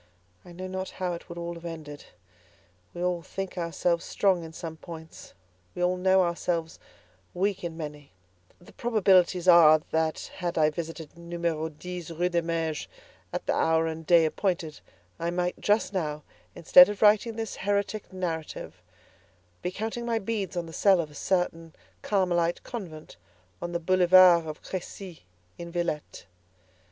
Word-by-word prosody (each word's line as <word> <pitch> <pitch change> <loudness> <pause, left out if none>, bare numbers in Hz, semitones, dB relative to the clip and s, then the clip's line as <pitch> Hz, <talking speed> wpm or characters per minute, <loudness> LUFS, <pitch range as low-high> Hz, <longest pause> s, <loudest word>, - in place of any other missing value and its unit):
I 175 - -13
know 185 +2 -7
not 190 0 -4
how 180 -1 -1
it 170 - -9
would 170 - -8
all 170 0 -4
have 170 0 -11
ended. 155 -4 -8 0.9
We 175 - -5
all 180 -1 0
think 195 +3 -6
ourselves 170 0 -1
strong 190 -4 +1
in 160 - -8
some 160 -1 -7
points; 160 - -11 0.4
we 180 - -2
all 180 +1 +2
know 190 +1 +4
ourselves 170 -1 -2 0.6
weak 195 +1 0
in 165 -2 -5
many; 150 -3 -8 0.5
the 175 - -17
probabilities 185 -6 +3
are 165 -3 +8
that 160 0 -1
had 175 -2 -3
I 155 -1 +4
visited 165 0 -7
Numero 170 -2 -2
10, 175 +3 -7
Rue 175 +1 +1
des 170 -1 +1
Mages, 165 -2 -2 0.4
at - - -4
the - - +1
hour 160 0 +2
and 160 0 -4
day 165 0 +5
appointed, 165 -2 -2 0.4
I 170 - -1
might 180 0 -2
just 210 -1 +1
now, 150 -5 -2 0.3
instead 270 +10 +8
of 205 +1 -3
writing 215 +2 +4
this 225 -2 -5
heretic 205 +1 -2
narrative, 170 -4 -5 0.8
be 180 - -2
counting 220 +5 -4
my 230 -1 +1
beads 200 -4 -3
in 175 - -2
the 165 - -11
cell 195 0 +4
of 155 -3 -3
a - - -15
certain 165 -1 -1 0.3
Carmelite 175 -4 +1
convent 170 - -8 0.4
on 175 - -4
the 170 - -1
Boulevard 180 -1 +6
of 155 -1 -7
Crécy, 185 -1 -7 0.4
in 170 0 -7
Villette. 170 -3 -3
175 Hz, 160 wpm, -27 LUFS, 165-185 Hz, 0.9 s, are